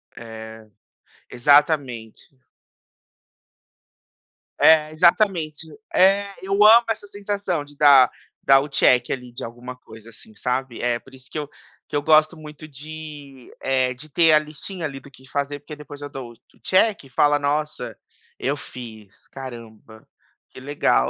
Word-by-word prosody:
É, 110 -1 -10 0.6
exatamente. 135 -4 +1 2.3
É, 155 -1 +5
exatamente. 165 -2 +1 0.3
É, 195 +2 +4 0.2
eu 195 +1 -3
amo 230 +2 +8
essa 215 -2 -3
sensação 200 -5 -3
de 145 - -19
dar 140 -3 +6 0.3
dar 135 0 +6
o 145 - -4
check 125 -3 +3
ali 125 -2 -5
de 120 - -8
alguma 120 +2 -8
coisa, 115 -2 -15
assim, 110 -1 -15
sabe? 125 +2 -3
É 120 -1 0
por 135 - -20
isso 130 +1 -15
que - - -6
eu 145 -1 -6 0.4
que - - -7
eu 145 - +1
gosto 155 +2 +4
muito 155 0 -11
de 145 -2 -10
eh, 130 -1 +1
de 150 +5 -13
ter 165 +1 +4
a 155 - +7
listinha 155 +4 -7
ali 135 -3 -6
do 140 +1 -17
que 130 -1 -18
fazer 145 0 -3
porque 145 +2 -10
depois 145 -1 -12
eu 145 - -6
dou 130 -4 -8
o 120 +2 -29
check 200 +1 +2
e 135 - -16
fala: 145 +3 +3
"Nossa, 145 -6 -3 0.4
eu 140 +3 -1
fiz, 115 -8 -12
caramba, 115 -4 -11 0.4
que - - -13
legal". 130 - +1
140 Hz, 150 wpm, -22 LUFS, 125-155 Hz, 2.3 s, amo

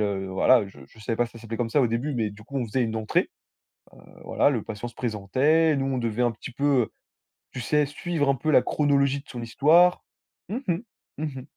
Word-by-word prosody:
heu, 100 -2 -1
voilà, 100 +4 +3
je 95 -7 -15
je 110 - -22
savais 110 +1 -3
pas 120 - +1
si - - -17
ça 115 - -11
s'appelait 115 0 -6
comme 120 - -1
ça 145 - +3
au - - +4
début 120 +5 -2
mais 110 -3 -1
du 105 +1 -13
coup, 140 +6 -8
on 125 - -1
faisait 125 +4 0
une 110 -1 -2
entrée, 110 -1 0 0.8
heu, - - -20
voilà, - - +2
le 120 -7 -1
patient 110 +2 -6
se 120 - -12
présentait, 130 +9 +2
nous 135 -1 -1
on 135 -1 -1
devait 115 -1 -1
un 120 - +2
petit 115 +3 -9
peu, 140 +4 -3 0.2
heu, - - -9 0.6
tu 125 - -6
sais 150 +7 +1
suivre 145 +1 -2
un 140 - +4
peu 155 +4 -2
la 140 - +6
chronologie 140 -2 +1
de 140 - -24
son 120 - -7
histoire. 160 +10 +4 0.5
Mmh 220 - -2
mh, - - +4 0.5
mmh 155 - -3
mh. 135 -4 -5
125 Hz, 245 wpm, -25 LUFS, 110-145 Hz, 0.8 s, la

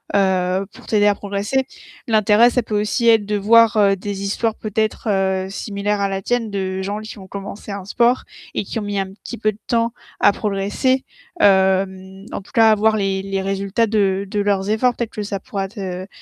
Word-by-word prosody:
heu, 190 -1 +2
pour - - -15
t'aider 210 -1 +3
à 205 - +5
progresser. 205 +7 -2 0.4
L'intérêt, 220 +1 +5
ça 245 0 0
peut 210 -1 -1
aussi 225 +3 0
être 220 -2 +4
de 210 +1 -1
voir, 225 +2 +5
heu, 200 -2 +4
des 200 +1 -5
histoires 215 +3 -1
peut-être, 215 +1 -2
heu, 190 -1 0
similaires 205 +1 -2
à 200 - +2
la 195 0 -3
tienne 240 +2 -1
de 190 -1 -2
gens 205 +2 -3
qui 215 0 -9
ont 190 - -11
commencé 200 +2 -7
un 200 -1 -5
sport 240 +5 +2 0.3
et - - 0
qui 215 - -4
ont - - -4
mis 205 0 -3
un 190 -1 -3
petit 235 +4 -9
peu 215 -1 +1
de 210 - -17
temps 230 0 +1 0.3
à - - +6
progresser. 210 +7 0 0.4
Hem, 190 0 +2
en - - -4
tout 190 - -19
cas, 225 -3 +6
avoir 215 +1 +3
les 195 -1 0
les 195 0 -2
résultats 195 +3 0
de 200 -2 +1
de 205 - -2
leurs 200 -1 0
efforts, 240 +3 +2
peut-être 235 -2 -3
que 210 - -4
ça 200 -1 -4
pourra 195 -1 -4
te 185 -2 -6
205 Hz, 205 wpm, -20 LUFS, 195-220 Hz, 0.4 s, à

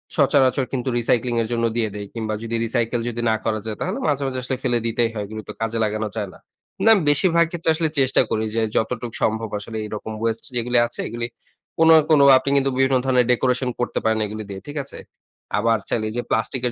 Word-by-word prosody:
সচরাচর 130 0 +3
কিন্তু 130 0 -1
রিসাইক্লিং 120 +1 +1
এর 115 - -2
জন্য 115 0 0
দিয়ে 110 -2 0
দেই। 105 0 -5
কিংবা 110 -2 -3
যদি 115 0 -3
রিসাইকেল 115 +1 0
যদি 120 0 -4
না 110 - +3
করা 110 -1 0
যায়, 110 -2 -4
তাহলে 190 +6 -2
মাঝে, 140 -1 0
মাঝে 130 -1 -3
আসলে 130 +1 -2
ফেলে 120 -2 +2
দিতেই 115 0 +1
হয়, 105 -2 -3
এগুলো 110 +1 -7
তো - - -5
কাজে 115 0 -1
লাগানো 110 0 -1
যায় 105 -3 -3
না। - - -16 0.5
না 225 - +8 0.2
বেশিরভাগ 170 +3 +4
ক্ষেত্রে 170 -2 -2
আসলে 160 -1 0
চেষ্টা 135 -1 +4
করি 110 0 0
যে, 115 - +1
যতটুক 120 +1 -1
সম্ভব 110 0 0
আসলে 110 +2 -7
এরকম 105 +1 -6
ওয়েস্ট 115 0 -1
যেগুলি 120 +1 +1
আছে, - - -8
এগুলি 115 0 -3 0.5
কোন, 165 0 +5 0.2
কোন 155 -2 +5 0.2
আপনি 130 +1 -2
কিন্তু 135 0 +2
বিভিন্ন 130 0 +3
ধরণের 125 -2 +3
ডেকোরেশন 125 +1 +1
করতে 120 - -1
পারেন, 110 0 +2
এগুলি 110 +1 -6
দিয়ে 95 -1 -7
ঠিক 145 +1 -6
আছে? 140 - -11 0.6
আবার 115 +2 +2
চাইলে 110 - 0
এই - - -7
যে - - +1
প্লাস্টিকের 125 +2 0
120 Hz, 215 wpm, -22 LUFS, 110-130 Hz, 0.6 s, না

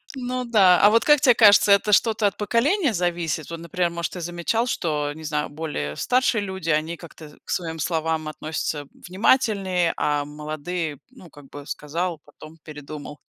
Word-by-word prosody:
Ну 250 0 -3
да, 195 -6 +5
а 205 - +6
вот 230 +1 +4
как 295 -1 +5
тебе 245 - +6
кажется, 205 -2 +6
это 200 +1 +4
что-то 215 0 +3
от 195 - -4
поколения 255 - +1
зависит? 170 -4 -2
Вот, 165 0 -6
например, 170 +1 -1
может, 170 -1 -4
ты 180 - -6
замечал, 175 +8 -1
что, 150 -8 -2
не 160 - -11
знаю, 150 -1 -2
более 145 - -5
старшие 250 -3 +1
люди, 190 -4 -5
они 160 +2 0
как-то 160 -2 -13
к - - -19
своим 165 -2 -3
словам 160 0 -1
относятся 155 -1 -4 0.2
внимательнее, 190 -3 +1
а 145 -1 0
молодые, 150 +1 -5
ну, 190 - -16
как 145 -1 -15
бы, 145 -1 -10
сказал, 165 +4 -4
потом 155 +2 -15
передумал. 150 -1 -9
170 Hz, 170 wpm, -23 LUFS, 155-205 Hz, 0.2 s, а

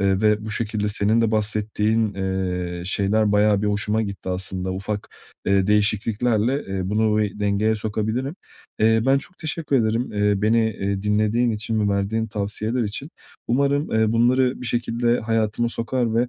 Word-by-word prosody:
eee, 95 0 +2
ve 105 0 +2
bu 110 - -5
şekilde 105 -1 -1
senin 105 +2 +2
de 115 - +2
bahsettiğin, 110 0 0
eee, 90 -2 -3
şeyler 100 +2 +1
bayağı 105 0 +3
bir - - +1
hoşuma 105 +2 +1
gitti 100 -3 -6
aslında, 95 0 -3
ufak, 100 +2 -4 0.4
eee, 100 -1 +3
değişikliklerle, 110 +4 +1
eee, 95 0 -3
bunu 110 0 +2
bir 105 0 -4
dengeye 105 +2 +1
sokabilirim. 110 - -2 0.4
Eee, 110 +1 +4
ben 135 +1 +4
çok 180 +6 -12
teşekkür 155 -3 -2
ederim, 115 0 0
eee, 105 -1 +1
beni, 110 +1 +3
eee, 100 -2 -3
dinlediğin 105 +3 +1
için 110 0 -2
ve 100 -1 +1
verdiğin 110 +3 -1
tavsiyeler 110 +3 -2
için. 115 +9 -4 0.4
Umarım, 140 +4 +1
eee, 110 0 +2
bunları 125 +3 +2
bir 125 - -5
şekilde 120 +1 0
hayatıma 115 +1 0
sokar 115 0 -1
ve, 120 +2 +2
110 Hz, 160 wpm, -22 LUFS, 100-115 Hz, 0.4 s, Eee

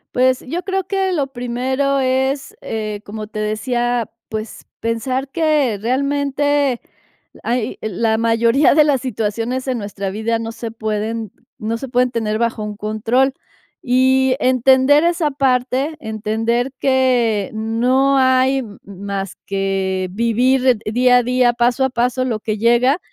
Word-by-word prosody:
Pues, 255 0 +3
yo 345 +7 -3
creo 385 -1 -2
que 385 0 0
lo 295 -6 0
primero 260 +2 -1
es, 265 +1 0
eh, 215 -2 -4
como 215 +1 -7
te 215 0 -7
decía, 240 +2 -1 0.2
pues, 215 0 -6
pensar 255 +4 -2
que 295 -7 +1
realmente 280 +2 0 0.6
hay 235 -1 -2
la 220 +2 0
mayoría 230 +5 +3
de 305 -1 +6
las 280 -4 +1
situaciones 230 +2 -3
en 255 -2 0
nuestra 200 -2 -5
vida 220 +3 -1
no 225 0 -5
se 225 0 -6
pueden 220 -1 -3 0.2
no 225 +2 -3
se 270 +2 -7
pueden 250 0 +2
tener 215 -3 -1
bajo 230 -2 -1
un 210 -1 -6
control. 225 +6 0 0.5
Y 260 +1 +3
entender 260 +3 +4
esa 340 -3 +1
parte, 270 +2 0
entender 225 +2 -1
que 245 -6 +2
no 250 +5 +1
hay 260 +1 +3
m 215 -6 -8
más 200 0 -5
que 195 -1 -1
vivir 245 +4 +2
eh 225 -4 +2
día 250 +1 +5
a 245 - +2
día, 250 0 +3
paso 240 +2 +1
a 265 - +2
paso 250 +1 0
lo 235 -4 -2
que 215 0 -3
llega. 240 - +3
245 Hz, 145 wpm, -18 LUFS, 220-265 Hz, 0.6 s, de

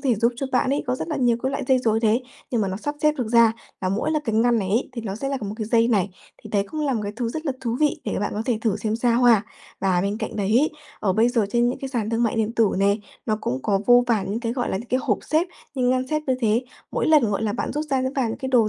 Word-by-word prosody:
thể 255 -3 +3
giúp 235 +3 +2
cho 275 - -2
bạn 255 +1 +2
ấy, 280 - 0
có 250 - +1
rất 260 - -5
là 310 - -2
nhiều 245 -4 +2
cái 265 - 0
loại 275 - -3
dây 260 - +5
rối 225 -3 +1
đấy, 225 +2 +2 0.3
nhưng 235 - +1
mà 195 - 0
nó 190 - -3
sắp 290 +8 -4
xếp 300 0 +5
được 240 - -1
ra, 230 -1 +5 0.3
là 185 - -1
mỗi 200 +10 0
cái 225 - -1
ngăn 235 +1 +3
này 190 -3 -2
ấy, 225 +6 +1
thì 235 - -5
nó 195 -3 -4
sẽ 275 +5 -3
là 275 - -1
một 205 -1 -4
cái 220 - -3
dây 230 +1 +3
này. 205 -5 +2 0.3
Thì - - -10
đấy 200 -1 +1
cũng 310 - -4
là 285 -3 +1
một 225 - -1
cái 205 0 -4
thứ 235 -1 -1
rất 315 +7 -5
là 275 - +1
thú 235 -2 -2
vị 300 -1 +2
để 210 - -2
cho - - -2
bạn 205 - -2
có 215 - -2
thể 240 -4 +1
thử 220 -3 +1
xem 215 +1 -2
sao 240 +1 +2
ha. 230 -4 +6 0.4
Và 185 -2 +2
bên 200 +3 -1
cạnh 220 - -4
đấy 205 +3 +2
ấy, 300 +4 +2 0.3
ở 195 -3 +1
bây 225 +4 +3
giờ 235 -4 +1
trên 240 +1 +3
những 250 - -3
cái 270 - -5
sàn 230 -5 -2
thương 230 +1 +1
mại 230 -1 +1
điện 220 0 0
tử 225 -3 +3
nè, 200 +1 +3 0.3
nó 215 -1 +1
cũng 130 +1 -2
có 195 -1 +1
vô 245 0 +6
vàn 215 -5 0
những 225 - -2
cái, 230 -1 -2
gọi 245 -1 -2
là, - - 0
những 230 +5 -7
cái 255 - +1
hộp - - +1
xếp, 315 +3 +1 0.3
những 250 -2 +2
ngăn 255 0 +1
xếp 305 +1 -1
như 260 - +2
thế. 225 +1 +2 0.3
Mỗi - - 0
lần, 295 -9 +4
gọi 200 - -1
là, 210 - 0
bạn 240 - -3
rút 300 +2 -2
ra, 265 -1 +2
rút 260 +1 -1
vào 255 -4 +1
những 225 - -4
cái 265 -1 -4
đồ 235 -4 +4
235 Hz, 330 wpm, -23 LUFS, 215-255 Hz, 0.4 s, ha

